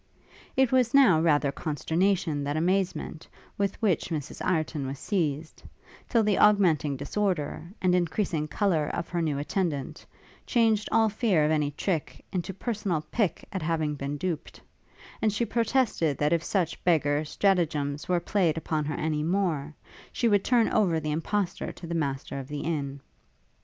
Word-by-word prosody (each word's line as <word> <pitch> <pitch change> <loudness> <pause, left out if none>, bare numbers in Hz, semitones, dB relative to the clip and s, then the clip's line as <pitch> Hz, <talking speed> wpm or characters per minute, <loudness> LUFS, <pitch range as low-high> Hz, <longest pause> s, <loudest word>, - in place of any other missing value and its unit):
It 265 -2 +4
was 255 -1 +3
now 195 - +6
rather 145 -4 +3
consternation 160 +1 0
than 145 +2 -2
amazement 180 -1 -1 0.3
with 200 -1 -1
which 190 -6 +1
Mrs 155 -5 -4
Ireton 155 -5 -1
was 135 +1 -5
seized, 155 -4 -2 0.5
till 230 -3 +3
the 210 -2 +2
augmenting 170 -9 +4
disorder, 170 +2 -2
and 180 -1 +4
increasing 175 -3 0
colour 165 -4 +1
of 170 - -4
her 170 -1 -1
new 155 -4 0
attendant, 150 -1 -2 0.4
changed 225 -3 +2
all 225 0 +4
fear 205 -7 +2
of 155 - +1
any 150 -2 +1
trick 160 +2 -3
into 185 0 -2
personal 195 -5 -2
pique 200 -9 0
at 190 - -2
having 155 -2 0
been 140 0 -4
duped; 170 -1 -4 0.6
and 220 - +3
she 210 +4 0
protested 230 - +1
that 150 +2 +2
if 170 -1 +1
such 175 -4 -1
beggar 150 -4 +2
stratagems 155 -4 0
were 180 -1 +3
played 170 -3 +1
upon 155 -1 -1
her 150 0 -2
any 155 -1 -1
more, 165 -4 0 0.4
she 235 - 0
would 205 -3 +3
turn 240 -3 +3
over 175 -6 +2
the 155 -1 -3
impostor 175 +5 -2
to - - -10
the 170 - -4
master 140 -4 -2
of 135 - -7
the 145 0 -5
inn. 140 -4 -3
165 Hz, 160 wpm, -27 LUFS, 150-200 Hz, 0.6 s, now